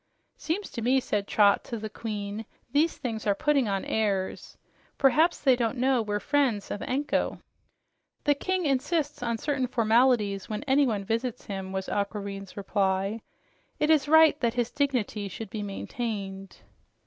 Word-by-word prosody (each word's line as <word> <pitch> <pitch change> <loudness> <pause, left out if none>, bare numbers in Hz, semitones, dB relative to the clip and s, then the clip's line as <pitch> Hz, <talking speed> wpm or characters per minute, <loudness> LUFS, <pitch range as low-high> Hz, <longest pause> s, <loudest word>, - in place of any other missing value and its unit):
"Seems 375 +6 -3
to 235 - -5
me," 255 +4 +3
said 205 -5 -2
Trot 205 -2 +4
to 235 - -4
the 215 0 -5
queen, 210 -1 -5 0.2
"these 305 +5 +2
things 225 -4 -4
are 200 - +3
putting 280 -1 +2
on 195 -1 -1
airs. 200 -4 -2 0.4
Perhaps 310 +5 +3
they 265 -3 +5
don't 240 0 -1
know 255 0 +2
we're 205 -1 -2
friends 255 -7 0
of 205 - -4
Anko." 280 +3 -1 0.9
"The 290 - +4
king 370 +5 -1
insists 290 +2 0
on 235 -1 -1
certain 270 0 -1
formalities 225 -4 +2
when 215 +4 -3
anyone 265 -7 +2
visits 230 +4 -2
him," 190 -2 -5
was 190 0 -3
Aquareine's 200 -1 -4
reply. 195 +1 0 0.6
"It 300 - +2
is 295 -3 +3
right 315 -1 +6
that 235 -2 0
his 240 -1 0
dignity 250 -8 -1
should 205 +2 -8
be 215 - -4
maintained." 195 -1 -5
230 Hz, 155 wpm, -27 LUFS, 205-275 Hz, 0.9 s, right